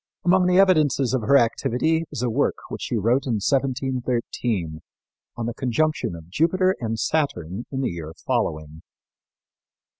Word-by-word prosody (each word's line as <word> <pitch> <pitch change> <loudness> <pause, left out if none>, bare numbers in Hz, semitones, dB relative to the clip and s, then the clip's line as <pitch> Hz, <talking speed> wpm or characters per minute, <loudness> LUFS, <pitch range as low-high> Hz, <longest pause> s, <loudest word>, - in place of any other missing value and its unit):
Among 180 0 +4
the 180 0 +3
evidences 155 -9 +3
of 130 - +1
her 140 +6 +5
activity 130 +7 +1
is 125 - -4
a 125 - +1
work 140 +6 +1
which - - -6
she 125 - -2
wrote 115 +6 +1
in 125 - 0
1713 125 - -1 0.6
on 120 - -3
the 120 - -3
conjunction 130 - -1
of 80 -1 -11
Jupiter 185 - +2
and 115 -1 -2
Saturn 110 - -1
in 135 -1 -2
the 130 - -1
year 80 -2 -7
following. 75 +1 -2
125 Hz, 150 wpm, -23 LUFS, 110-150 Hz, 0.6 s, her